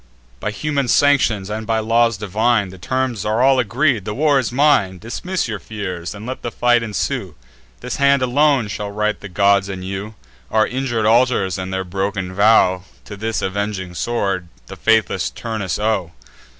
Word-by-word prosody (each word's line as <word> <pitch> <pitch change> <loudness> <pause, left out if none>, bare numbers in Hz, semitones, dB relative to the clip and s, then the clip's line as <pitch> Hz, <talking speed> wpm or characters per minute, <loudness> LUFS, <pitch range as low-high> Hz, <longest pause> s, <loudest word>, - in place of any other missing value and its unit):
By 105 - -2
human 140 +4 -2
sanctions, 120 -8 +3
and 110 +1 -4
by 115 -1 +1
laws 115 0 +2
divine, 105 +1 +1
The 95 0 -12
terms 130 +1 -2
are 110 +4 +1
all 135 -1 +5
agreed; 125 0 +1
the 105 +2 -4
war 145 -1 +3
is 125 - -2
mine. 125 -9 +3
Dismiss 150 - -3
your 110 -3 -4
fears, 90 -4 -6
and 105 +2 -9
let 130 +1 -5
the 120 - -3
fight 120 0 +2
ensue; 110 -3 -3 0.5
This 125 - -4
hand 140 -2 +3
alone 135 -1 +3
shall 105 0 -4
right 105 +1 -1
the 100 - -9
gods 100 +1 +2
and 95 -1 -6
you: 100 +3 -5 0.3
Our 110 0 +3
injur'd 125 -4 -2
altars, 110 -5 +2
and 95 0 -5
their 95 0 -2
broken 95 0 -3
vow, 95 -3 +4 0.2
To 105 - -8
this 110 -1 -3
avenging 95 -2 -3
sword 100 -3 -2 0.2
the - - -9
faithless 110 -1 +1
Turnus 110 -5 -4
owe." 105 -5 -1
110 Hz, 175 wpm, -19 LUFS, 100-120 Hz, 0.5 s, all